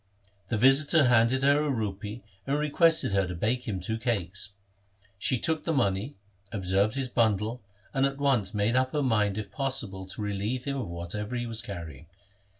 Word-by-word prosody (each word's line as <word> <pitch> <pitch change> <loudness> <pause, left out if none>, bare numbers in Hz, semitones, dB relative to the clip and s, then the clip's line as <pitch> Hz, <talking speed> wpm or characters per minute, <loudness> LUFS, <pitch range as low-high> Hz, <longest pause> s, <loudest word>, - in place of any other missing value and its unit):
The 115 - 0
visitor 135 +3 +5
handed 120 +3 +3
her 140 +2 +4
a 150 - -1
rupee 105 -2 -3 0.2
and 140 +1 +1
requested 155 - +2
her 95 -1 +2
to 90 - -5
bake 115 +8 -1
him 100 -4 -2
two 110 +5 -3
cakes. 100 -4 -2 0.7
She 130 - +1
took 160 +5 0
the 165 - -1
money, 105 +1 0 0.4
observed 100 +1 +1
his 135 -1 -1
bundle, 110 -1 0 0.3
and 135 -1 +1
at 135 0 -5
once 130 -9 +1
made 105 +3 +1
up 130 0 +1
her 150 -1 +1
mind 105 -5 +1
if 105 -3 -5
possible 100 -6 -1
to 95 - -7
relieve 105 +5 -2
him 140 0 -3
of 130 - -3
whatever 85 +7 -5
he 120 0 -2
was 115 -1 -4
carrying. 85 -6 -8
115 Hz, 180 wpm, -28 LUFS, 100-135 Hz, 0.7 s, visitor